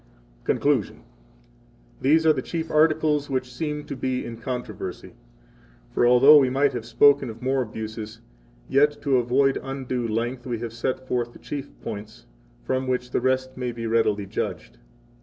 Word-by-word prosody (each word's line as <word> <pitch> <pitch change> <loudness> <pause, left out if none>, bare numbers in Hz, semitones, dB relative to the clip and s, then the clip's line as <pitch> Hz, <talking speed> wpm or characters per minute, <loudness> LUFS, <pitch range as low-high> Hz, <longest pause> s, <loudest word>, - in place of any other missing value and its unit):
Conclusion. 140 -8 +1
1 - - -22 1.0
These 160 +4 +4
are 155 - +6
the 135 - -2
chief 160 +3 -4
articles 155 -1 +2
which 130 -2 -2
seem 150 +2 -3
to 145 - -6
be 130 0 -2
in 115 - -6
controversy. 125 +1 -6 0.8
For 120 - +3
although 135 +5 +8
we 130 -2 +3
might 140 +2 +2
have 115 -2 -5
spoken 140 +3 +4
of 115 +2 -10
more 130 +1 +1
abuses, 110 -1 -6 0.5
yet, 145 +2 +3
to 140 -3 +3
avoid 130 +3 +2
undue 130 -3 -3
length, 120 +4 -3
we 120 -2 -2
have 115 0 -6
set 130 +2 -3
forth 120 -1 -1
the - - -13
chief 140 -2 -6
points, 105 +1 -7 0.4
from 130 - -1
which 125 -1 -2
the - - 0
rest 130 0 0
may 125 -1 -3
be 115 -1 -6
readily 110 -3 +1
judged. - - -5
130 Hz, 165 wpm, -24 LUFS, 115-140 Hz, 1.0 s, although